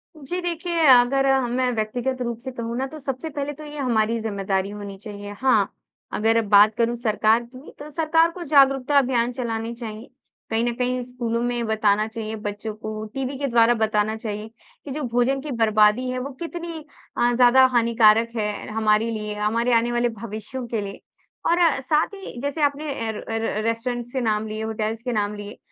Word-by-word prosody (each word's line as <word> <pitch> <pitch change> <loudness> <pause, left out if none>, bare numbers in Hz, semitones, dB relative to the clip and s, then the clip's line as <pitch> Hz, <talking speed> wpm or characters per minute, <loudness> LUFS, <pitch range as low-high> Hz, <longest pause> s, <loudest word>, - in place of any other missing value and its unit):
जी 310 +4 -5
देखिए, 340 -1 -1
अगर 260 +2 +6 0.2
मैं 250 0 +1
व्यक्तिगत 245 +4 -2
रूप 235 -2 -2
से 260 +1 -6
कहूँ 235 -1 -4
ना, 265 - -1
तो 310 +2 -10
सबसे 270 +3 -4
पहले 290 -1 -4
तो 305 +2 -11
ये 295 0 -9
हमारी 230 -4 +1
ज़िम्मेदारी 195 -2 -1
होनी 205 -1 -7
चाहिए। 205 -1 -8
हाँ, 265 -1 +3 0.4
अगर 225 +1 +2
बात 210 +1 +6
करूँ 235 +1 +1
सरकार 225 0 +2
की, 255 +4 -13
तो 295 +1 -8
सरकार 325 +2 +2
को 350 +1 -7
जागरूकता 275 -2 +4
अभियान 245 -3 +2
चलाने 235 -2 -3
चाहिए। 225 -1 -8 0.4
कहीं 225 +1 +1
न 240 - 0
कहीं 250 0 -1
स्कूलों 240 -2 -3
में 240 -1 -1
बताना 215 -1 +2
चाहिए, 220 -1 -5
बच्चों 210 +1 -5
को 215 0 -6
टीवी 270 0 -3
के 280 0 -1
द्वारा 235 -1 +4
बताना 215 -1 +1
चाहिए, 215 -1 -5 0.4
कि 280 - -6
जो 300 +2 -4
भोजन 245 +2 +1
की 300 +1 -6
बर्बादी 220 +1 +3
है 255 - -2
वो 265 +2 -4
कितनी 335 -2 -5 0.3
अ, 240 0 +3
ज़्यादा 250 +1 +6
हानिकारक 230 -1 +4
है 210 -2 -3
हमारे 220 +1 +2
लिए 210 -1 -4
हमारे 230 +3 +1
आने 235 +1 +3
वाले 240 0 +1
भविष्यों 225 +3 -6
के 230 -2 -2
लिए। 200 -1 -7 0.5
और 345 +1 +3 0.2
साथ 300 +8 +1
ही 385 -10 -9
जैसे 285 +2 -3
आपने 290 +1 0 0.2
अ, - - 0
र 210 - -7
अ, 225 - -4
र 220 -1 -1
रेस्टोरेंट्स 240 +1 -2
से 260 - -1
नाम 220 -1 0
लिए 215 +1 -4
होटेल्स 220 +1 -3
के 245 - -2
नाम 210 -1 -1
लिए। 205 +1 -8
235 Hz, 190 wpm, -23 LUFS, 215-265 Hz, 0.5 s, अगर